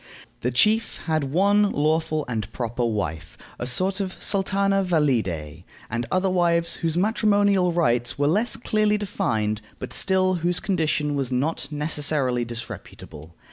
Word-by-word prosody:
The 125 - -1
chief 215 - +2
had 155 -3 0
one 200 +8 +3
lawful 155 0 0
and 110 -4 -3
proper 120 0 -3
wife, 105 -9 -3 0.2
a 120 - -3
sort 185 +10 +1
of 190 -2 -4
sultana 195 0 +1
valide, 110 - 0 0.3
and 120 +1 -2
other 185 +1 +2
wives 170 -2 +1
whose 165 -1 -1
matrimonial 200 -2 +2
rights 120 -8 +1
were 145 - +1
less 205 +11 +2
clearly 215 -2 +1
defined, 110 - -1 0.2
but - - -7
still 185 -1 +2
whose 175 +1 +1
condition 155 -6 0
was 135 -3 -2
not 135 +2 -1
necessarily 145 -4 0
disreputable. 85 -9 -9
155 Hz, 140 wpm, -24 LUFS, 120-190 Hz, 0.3 s, one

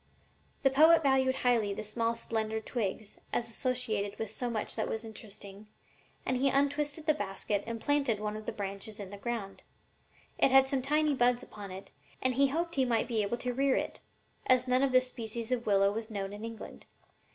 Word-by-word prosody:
'The 270 - +6
poet 320 +4 +6
valued 265 -1 +3
highly 230 -6 +2
the - - -4
small 230 +2 -1
slender 220 -1 -2
twigs, 215 -2 -4
as 235 - -1
associated 230 -4 -1
with 220 -2 -3
so 245 +2 -2
much 220 -3 -3
that - - -1
was 220 +1 -3
interesting, 205 -2 -10 0.6
and 255 - +1
he 275 +2 +3
untwisted 285 +3 0
the 310 - +4
basket 205 -2 -2
and 230 0 -4
planted 280 -5 +1
one 210 0 -3
of 215 0 -8
the - - 0
branches 200 +2 -6
in 195 -2 -7
the 205 - -7
ground. 210 -3 -4 0.8
It - - +5
had 265 0 +6
some 270 -1 0
tiny 300 +2 +2
buds 245 -1 +2
upon 205 -2 -9
it, 190 +1 -9 0.3
and 255 0 +1
he 275 +2 +4
hoped 335 +5 -2
he 270 - +2
might 235 -3 +1
be 225 -3 +1
able 205 +4 -1
to 250 0 -3
rear 270 +1 +2
it, - - -2 0.5
as 255 -1 +4
none 255 +1 +3
of 275 -1 +2
this 255 0 +4
species 230 -1 -5
of 240 -2 -1
willow 200 -1 +4
was 220 +2 -4
known 200 -2 -4
in 210 +1 -8
England. 230 -1 -8
235 Hz, 200 wpm, -31 LUFS, 210-265 Hz, 0.8 s, The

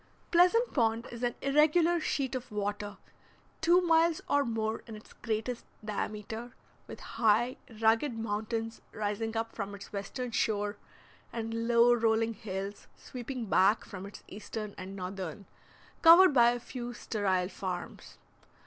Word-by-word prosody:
Pleasant 365 +8 +4
Pond 230 -2 +1
is 235 0 -8
an 240 -1 0
irregular 310 +5 +4
sheet 275 -4 -1
of 255 -2 -5
water, 205 0 -3 0.6
two 345 +3 +5
miles 330 -1 +3
or 285 0 +3
more 225 -3 -2
in 225 - -8
its 215 - -14
greatest 230 +1 -3 0.2
diameter, 215 +2 -4 0.3
with - - -9 0.2
high, 230 +3 +3 0.2
rugged 225 +3 +2
mountains 225 +1 -3
rising 215 +2 -2
up 225 0 -2
from 200 -1 -5
its 200 - -12
western 235 +5 -4
shore, 210 -2 0 0.6
and 230 0 -3
low 235 0 +6
rolling 225 -1 +2
hills 200 -1 -6
sweeping 250 -1 -6
back 200 +2 +3
from 195 -2 -8
its 200 - -12
eastern 210 0 -6
and 190 +1 -8
northern, 185 -1 -6 0.6
covered 340 +1 +9
by 240 -3 +6
a 245 0 -1
few 240 0 -7
sterile 190 -6 0
farms. 185 -3 -6
225 Hz, 140 wpm, -31 LUFS, 205-250 Hz, 0.6 s, covered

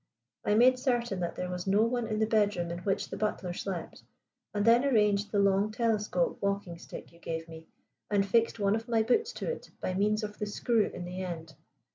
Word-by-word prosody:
I 210 - +2
made 255 +3 +5
certain 240 -6 0
that 175 -1 -2
there 180 0 -4
was 180 +1 -5
no 200 +3 +4
one 235 0 0
in 215 -1 -2
the 220 - +3
bedroom 205 -6 +1
in 170 - -4
which 195 +2 -1
the - - -4
butler 195 -4 -2
slept, 180 -2 -5 0.5
and 205 0 -1
then 235 +2 +6
arranged 210 -6 +2
the 205 - 0
long 200 +1 +3
telescope 215 -6 0
walking 200 -4 -2
stick - - -10
you 170 - -19
gave 165 -1 -4
me, 160 0 -11 0.4
and 200 -1 +2
fixed 230 +3 +2
one 200 -1 +2
of 225 +2 -4
my 225 -2 +3
boots 435 - +2
to - - -5
it 480 - -7
by 185 - -2
means 210 +3 +1
of 210 0 -6
the 210 - -2
screw 220 +1 +1
in 175 - -7
the 180 +1 -5
end. 165 -3 -6
205 Hz, 215 wpm, -30 LUFS, 180-225 Hz, 0.5 s, then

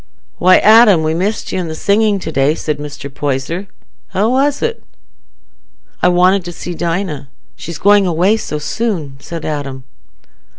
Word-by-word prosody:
"Why, 185 +1 +6
Adam, 215 -6 +6
we 155 0 0
missed 200 +7 -2
you - - -2
i' - - -5
the 160 - -5
singing 205 +4 +2
to 160 - -5
day," 145 +1 +2
said 150 -3 -3
Mr. 145 -1 -7
Poyser. 140 +6 -3 0.4
"How 210 +5 0
was 280 +2 +1
it?" 465 0 -2 1.2
"I - - +4
wanted 180 +2 +3
to 175 - -5
see 175 +1 -7
Dinah—she's 165 -2 -5
going 205 +1 +4
away 180 +6 +2
so 155 -8 -4
soon," 155 -4 -3
said 165 +3 -7
Adam. 140 -3 -4
175 Hz, 155 wpm, -15 LUFS, 150-205 Hz, 1.2 s, Why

